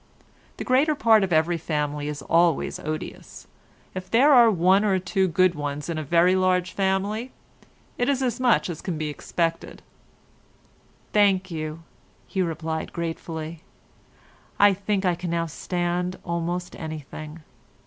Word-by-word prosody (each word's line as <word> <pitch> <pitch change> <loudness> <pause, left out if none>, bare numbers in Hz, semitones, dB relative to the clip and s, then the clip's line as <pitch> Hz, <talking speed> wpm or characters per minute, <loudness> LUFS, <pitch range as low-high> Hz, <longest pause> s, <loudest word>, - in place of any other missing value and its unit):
The - - -4
greater 280 +5 +3
part 220 -5 +4
of 190 - -2
every 165 +1 +2
family 150 -2 -2
is 150 -2 -5
always 165 0 +2
odious; 155 0 -7 0.5
if 185 0 -7
there 275 +6 +5
are 240 -3 +7
one 190 +1 +3
or 195 -3 +2
two 190 +1 0
good 185 +1 +3
ones 145 0 -4
in 165 -2 -2
a - - -3
very 170 +5 +3
large 185 -1 +1
family, 200 +5 -1 0.7
it 245 - +1
is 270 -1 +1
as 245 -1 -1
much 250 -2 +3
as 170 -3 -6
can 175 -4 -4
be 155 -1 -3
expected." 165 +3 -3 1.3
"Thank 195 -3 +3
you," 155 0 -5 0.4
he 190 - -2
replied, 160 -2 -3
gratefully, 165 -1 -5 1.0
"I 205 0 +6
think 200 0 -2
I 180 - +3
can 175 +1 -5
now 170 0 0
stand 175 +2 -2
almost 170 +1 -3
anything. 155 0 -8
175 Hz, 145 wpm, -24 LUFS, 160-195 Hz, 1.3 s, are